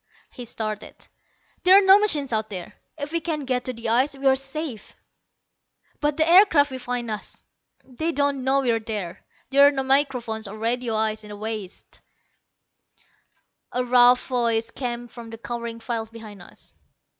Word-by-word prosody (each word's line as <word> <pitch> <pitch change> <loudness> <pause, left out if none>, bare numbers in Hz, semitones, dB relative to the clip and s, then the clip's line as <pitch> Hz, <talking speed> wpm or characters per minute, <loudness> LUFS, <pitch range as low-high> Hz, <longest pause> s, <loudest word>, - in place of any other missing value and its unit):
He 245 - -9
started. 215 -2 -5 0.7
"There 370 +2 +7
are 400 - +4
no 385 +1 +8
machines 295 - +1
out 220 0 -1
there. 195 +1 -7 0.2
If 290 0 -5
we 335 - 0
can 315 -3 -3
get 250 -1 -1
to 255 - -2
the 230 -1 -5
ice 260 +5 +2
we 275 0 -9
are 265 0 +6
safe." 270 -3 -6 1.0
"But 295 -1 0
the 315 0 +2
aircraft 330 -6 +6
will 260 - -5
find 245 -2 -4
us." 210 - -7 0.4
"They 315 +6 -3
won't 285 -2 0
know 265 +2 +1
we're 235 -3 +1
there. 210 -6 -5 0.3
There 280 +1 +7
are - - +4
no 270 -2 -2
microphones 260 -5 0
or 205 +2 -8
radio 230 +1 -1
eyes 215 0 0
in 210 - -12
the 205 - -8
wastes." 215 -3 -7 1.7
A 250 0 0
rough 245 0 +5
voice 230 -3 0
came 240 -2 -5
from 235 -1 -11
the 225 - -9
cowering 235 0 -6
files 225 -1 -4
behind 220 -4 -11
us. - - -15
245 Hz, 170 wpm, -24 LUFS, 225-280 Hz, 1.7 s, no